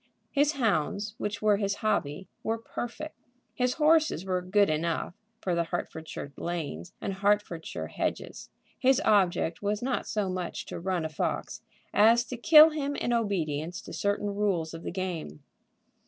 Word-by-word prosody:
His 290 +2 +3
hounds, 210 - 0
which 205 +1 -3
were 210 -1 +4
his 200 -1 0
hobby, 190 -5 -1
were 225 +1 -1
perfect. 240 +6 -6 0.4
His 250 0 0
horses 310 - +3
were 185 -1 0
good 200 +3 +3
enough 165 +2 -1 0.3
for 180 - -1
the 170 0 +1
Hertfordshire 160 -4 -5
lanes 155 - -4
and 195 - -3
Hertfordshire 200 -4 0
hedges. - - -4 0.3
His 265 0 +4
object 180 - +2
was 205 +2 -1
not 260 0 -1
so 210 -2 -1
much 185 -1 -4
to - - -6
run 175 -2 -1
a - - -2
fox 155 - -3 0.3
as 230 +3 +6
to 250 +2 -6
kill 310 +6 +8
him 285 -2 -2
in 240 - -1
obedience 175 -6 -1
to - - -9
certain 205 0 -1
rules 190 -6 0
of 165 - -7
the - - -4
game. 170 - -4
200 Hz, 155 wpm, -28 LUFS, 170-230 Hz, 0.4 s, kill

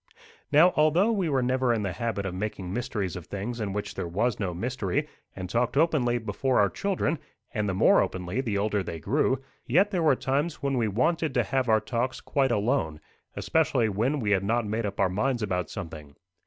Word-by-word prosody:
Now 165 +5 +6
although 160 +8 +4
we 195 -7 0
were 135 -3 +1
never 130 0 +1
in 110 -3 0
the 100 - -1
habit 100 +2 -3
of 95 - -3
making 95 -1 -4
mysteries 110 -7 -2
of 90 - -8
things 110 +5 -4
in 105 -2 -2
which 105 +1 -4
there - - -4
was 105 +7 0
no 95 -4 -1
mystery, 100 +1 -2 0.3
and 95 -1 -5
talked 120 +6 0
openly 140 -7 +3
before 125 +2 0
our 100 -1 +3
children, 185 -6 -1 0.3
and 105 -3 -1
the 95 - -1
more - - +5
openly 95 +6 -2
the 110 -6 -1
older 105 0 0
they 85 -3 -5
grew, 130 - +1 0.2
yet 190 - +3
there 180 -4 0
were 150 -4 +4
times 145 +6 -1
when 140 -3 -2
we 120 -3 +1
wanted 150 - 0
to 120 - +3
have 125 +4 -1
our 110 0 +5
talks 125 +1 -2
quite 135 -3 0
alone, 105 - 0 0.4
especially 135 -8 +1
when 120 +9 0
we 105 -4 -1
had 100 -1 +3
not 115 +3 +1
made 110 +1 -1
up 100 - -7
our 100 - +4
minds 115 +6 -1
about 90 -4 -1
something. 75 -4 -8
115 Hz, 210 wpm, -27 LUFS, 100-135 Hz, 0.4 s, Now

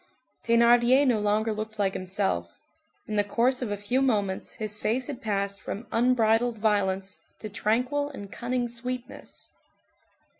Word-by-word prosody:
Thénardier 240 +3 +5
no 240 -5 +3
longer 210 +2 +1
looked 215 +1 -5
like 195 -2 +1
himself; 185 - -1 0.6
in 215 - -3
the 205 - +4
course 240 +5 +1
of 245 - -2
a 205 - -2
few 225 +6 0
moments 205 -7 0
his 215 -1 -3
face 230 +4 -1
had 270 -2 -5
passed 200 -3 -2
from 215 +5 -6
unbridled 235 -1 +2
violence 200 -2 0 0.2
to 215 - -7
tranquil 250 +8 0
and 205 -8 -9
cunning 245 0 -2
sweetness. 245 +1 -7
220 Hz, 145 wpm, -27 LUFS, 205-245 Hz, 0.6 s, Thénardier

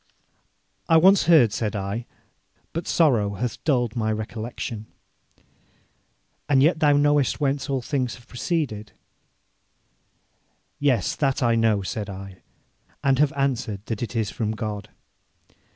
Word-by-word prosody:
'I 165 - +6
once 190 +4 +6
heard,' 150 -11 +5
said 110 -1 -2
I, 100 +4 -4 0.7
'but 165 - -4
sorrow 115 -11 +2
hath 120 +2 -4
dulled 125 -6 +1
my 110 -2 0
recollection.' 110 +1 -5 1.6
'And 135 -2 +5
yet 160 +2 +3
thou 150 -2 +4
knowest 145 -2 +2
whence 140 0 -1
all 135 -2 -1
things 130 -3 -2
have 120 -1 -18
proceeded.' 125 -6 -3 1.9
'Yes, 130 -9 +1
that 135 -2 0
I 120 -1 +3
know,' 110 -3 +2
said 105 +2 -4
I, 95 -1 -8 0.7
'and 135 -1 +3
have 150 -1 +4
answered 125 -7 -2
that 110 -2 -4
it 120 0 -4
is 110 -2 -1
from 110 -1 -2
God.' 105 -2 -5
120 Hz, 130 wpm, -24 LUFS, 110-140 Hz, 1.9 s, I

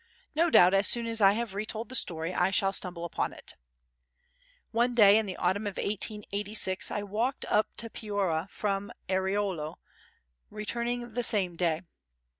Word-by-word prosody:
No 335 +3 +3
doubt 180 - +6
as 195 +1 +4
soon 235 -1 +2
as 230 -1 -1
I 195 0 +7
have 230 -2 -3
retold 215 +3 -4
the 260 - -6
story 165 -5 -1
I 180 +1 +2
shall 195 0 +2
stumble 175 -3 -3
upon 170 - -2
it. - - -8 1.2
One 240 +1 +1
day 205 -3 +7
in 220 - -2
the 185 - -5
autumn 195 +4 0
of 200 - -5
1886 205 -1 -1
I 205 - -3
walked 225 +6 -2
up 210 +1 +2
to 235 - -1
Piora 195 -6 -2
from 200 -1 -2 0.2
Airolo, 190 -4 -1 0.7
returning 235 +2 -4
the 245 - -1
same 195 -7 +3
day. 165 -1 0
205 Hz, 160 wpm, -29 LUFS, 190-225 Hz, 1.2 s, I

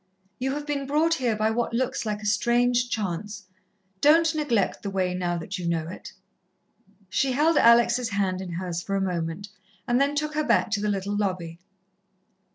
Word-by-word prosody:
You 265 +1 -1
have 295 0 -5
been 285 -2 -3
brought 310 +4 +2
here 250 -8 0
by 215 +1 +1
what 235 0 -1
looks 260 -1 -1
like 210 0 -3
a - - -6
strange 240 +4 +2
chance. 205 0 -4 0.6
Don't 320 +2 +5
neglect 280 -11 0
the 200 - -4
way 185 -2 -1
now 175 -1 -1
that 180 +4 -5
you 175 - -3
know 165 -2 -1
it." 180 - -9 1.0
She 260 +7 0
held 310 +5 +3
Alex' 235 -1 +4
hand 195 -3 -1
in 180 -2 -6
hers 175 -1 -3
for 195 +2 -3
a - - +1
moment, 180 +1 -3 0.4
and 245 +1 +2
then 285 +1 +1
took 305 +1 -1
her 305 0 0
back 220 - +2
to 210 -2 0
the 210 - 0
little 200 0 -2
lobby. 180 -5 -2
215 Hz, 185 wpm, -25 LUFS, 185-260 Hz, 1.0 s, Don't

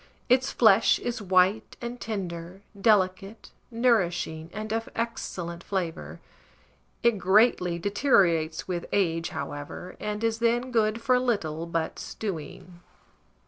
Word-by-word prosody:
Its 260 +2 +3
flesh 220 -2 +5
is 240 -2 -4
white 190 +2 +2
and 240 0 -6
tender, 185 -3 -5 0.3
delicate, 195 +1 +1 0.2
nourishing, 180 -9 0
and 215 +2 -5
of 225 0 -2
excellent 180 -7 -4
flavour; 180 -4 -4 0.8
it 235 -3 +3
greatly 190 -3 +3
deteriorates 175 - +2
with 175 -2 -3
age, 165 -4 +1
however, 145 +4 -6
and 210 +1 -4
is 225 0 0
then 240 +2 +1
good 225 -1 +1
for 250 0 +3
little 170 -10 -1
but 165 -1 -2
stewing. 175 -2 -7
195 Hz, 115 wpm, -27 LUFS, 170-230 Hz, 0.8 s, flesh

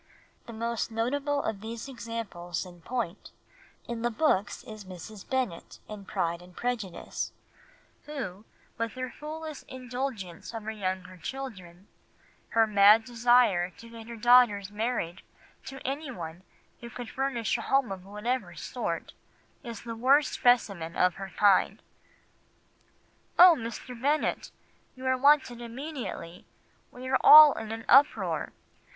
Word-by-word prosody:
The 235 - -8
most 230 +1 -2
notable 280 +6 -1
of 210 -3 -3
the 225 +1 -6
examples 225 - -5
in 175 -1 -13
point 220 -2 -4 0.6
in 235 -1 -4
the 240 - +1
books 220 -4 0
is 215 -4 -10
Mrs. 185 +2 -11
Bennet 255 -10 -2
in 210 -2 -9
Pride 170 -1 -2
and 180 0 -16
Prejudice, 230 -7 -3 0.8
who, 210 -10 -6 0.4
with 230 -1 -2
her 255 -1 -5
foolish 310 0 -7
indulgence 250 -7 -6
of 225 - -5
her 220 - -4
younger 185 -3 -4
children, 190 -5 -8 0.6
her 225 0 +4
mad 210 +1 +6
desire 235 -6 +3
to 230 - -13
get 230 -1 -10
her 235 - -7
daughters 225 -4 +4
married 210 -5 -2 0.4
to 270 0 -8
anyone 250 - -5 0.4
who 235 - -9
could 245 0 -8
furnish 260 -6 -1
a - - -4
home 270 -6 +1
of 190 -2 -6
whatever 210 +6 -3
sort, - - -4 0.5
is 235 -5 -8
the 230 -1 -6
worst 270 +5 +3
specimen 200 -9 +2
of 180 -1 +3
her 195 - -5
kind. 200 -2 +4 1.6
"'Oh, 360 0 +10
Mr. 235 0 -7
Bennet, 295 +3 0 0.5
you 260 0 -10
are 260 0 +3
wanted 260 -3 +3
immediately; 240 - -7 0.5
we 255 +1 -9
are 265 0 +2
all 305 -1 +10
in 220 -1 -6
an 225 0 -6
uproar. 280 +3 +4
230 Hz, 135 wpm, -28 LUFS, 195-255 Hz, 1.6 s, Oh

